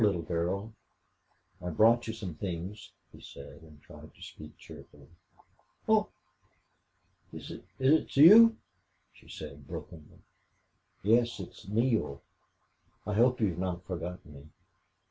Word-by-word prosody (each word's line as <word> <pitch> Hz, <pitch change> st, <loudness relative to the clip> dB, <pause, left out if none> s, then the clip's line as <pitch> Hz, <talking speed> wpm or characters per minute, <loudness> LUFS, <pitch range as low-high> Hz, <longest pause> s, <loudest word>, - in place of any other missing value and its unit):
little 100 Hz, -6 st, +2 dB
girl, 90 Hz, +6 st, -3 dB, 0.9 s
I've 90 Hz, -3 st, -5 dB
brought 115 Hz, +2 st, +4 dB
you 110 Hz, -, -3 dB
some 95 Hz, -6 st, -6 dB
things," 90 Hz, +5 st, -6 dB, 0.2 s
he -, -, -15 dB
said, 70 Hz, +3 st, -12 dB
and 75 Hz, -2 st, -17 dB
tried -, -, -14 dB
to -, -, -21 dB
speak -, -, -12 dB
cheerfully. 70 Hz, -1 st, -14 dB, 0.8 s
"Oh -, -, +3 dB, 1.2 s
is -, -, -9 dB, 0.3 s
it 140 Hz, +2 st, +2 dB
you?" 220 Hz, +9 st, +8 dB, 0.6 s
she -, -, -21 dB
said, 70 Hz, -2 st, -10 dB
brokenly. 80 Hz, -3 st, -10 dB, 0.9 s
"Yes, 115 Hz, +2 st, +2 dB
it's 95 Hz, -, -10 dB
Neale. 110 Hz, -, 0 dB, 0.8 s
I 105 Hz, -, -3 dB
hope 125 Hz, +4 st, +3 dB
you've 90 Hz, -6 st, 0 dB
not 90 Hz, -1 st, -4 dB
forgotten 90 Hz, -2 st, -7 dB
me." 70 Hz, +1 st, -14 dB
95 Hz, 120 wpm, -30 LUFS, 85-115 Hz, 1.2 s, you